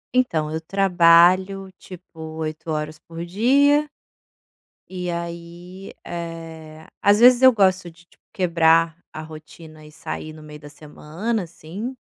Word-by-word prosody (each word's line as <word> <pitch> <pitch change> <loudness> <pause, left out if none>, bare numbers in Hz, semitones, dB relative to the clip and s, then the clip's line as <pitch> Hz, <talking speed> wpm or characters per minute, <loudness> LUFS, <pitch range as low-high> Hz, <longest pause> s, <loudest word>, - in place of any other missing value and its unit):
Então, 160 -12 0
eu 160 +1 -4
trabalho, 185 +1 +3
tipo, 180 -2 -14
8 160 0 -6
horas 155 0 -4
por 165 0 -9
dia. 280 +10 +2 1.0
E 180 -1 -5
aí, 170 +2 -8
eh, 165 -2 -8 0.2
às 205 +1 +4
vezes, 245 +1 +6
eu 260 -1 +7
gosto 190 -4 +1
de 170 +1 -21
tipo - - -30
quebrar 165 -2 +2 0.2
a 155 - -7
rotina 155 0 -13
e 150 - -15
sair 155 0 -7
no 155 0 -13
meio 150 0 -12
da 145 0 -13
semana, 160 +9 -5
assim. 180 +9 -8
170 Hz, 135 wpm, -21 LUFS, 160-190 Hz, 1.0 s, eu